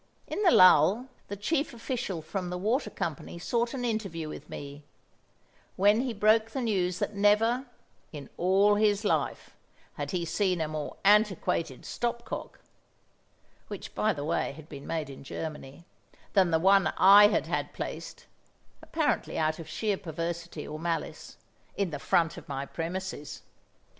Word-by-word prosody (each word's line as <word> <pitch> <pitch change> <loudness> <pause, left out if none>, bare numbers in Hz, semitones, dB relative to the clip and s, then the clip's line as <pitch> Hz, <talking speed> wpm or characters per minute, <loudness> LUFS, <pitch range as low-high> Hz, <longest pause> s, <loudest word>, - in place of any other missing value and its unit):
In - - -4
the 385 - +5
lull, 185 - +6 0.2
the 200 - -5
chief 275 +7 -1
official 230 -8 -4
from 180 +2 -4
the 180 - -3
water 225 +9 0
company 170 -2 -5
sought 235 +8 -1
an 250 -2 -3
interview 195 -9 -3
with - - -9
me, 145 +1 -8 0.9
when 205 +4 +4
he 260 -1 -2
broke 220 +1 +3
the 260 +4 -4
news 185 -6 0
that - - -2
never, 220 +6 +3 0.4
in 145 -4 -8
all 195 +3 +4
his 210 0 +2
life, - - -1 0.5
had - - -4
he 175 -3 -2
seen 185 0 0
a 160 - 0
more 155 -1 -5
antiquated 195 - +2
stop 235 0 -3
cock - - -7 1.1
(which, - - -8
by 215 - +1
the 145 -6 -4
way, 160 -3 -1
had 155 +1 -13
been 140 -2 -10
made 160 -2 -2
in 135 -1 -10
Germany) 150 +1 -7 0.5
than 190 -3 +4
the 165 - +3
one 190 +1 +4
I 200 +2 +9
had - - 0
had - - -2
placed - - -7 0.6
(apparently 315 -2 -1
out 155 0 0
of 160 -2 -9
sheer 210 -3 -1
perversity 170 -1 -5
or 155 +1 -6
malice) 165 0 -4 0.4
in 195 -4 0
the 145 - -4
front 165 +2 +1
of - - -11
my 135 0 -3
premises. 170 0 -5
185 Hz, 160 wpm, -28 LUFS, 160-215 Hz, 1.1 s, I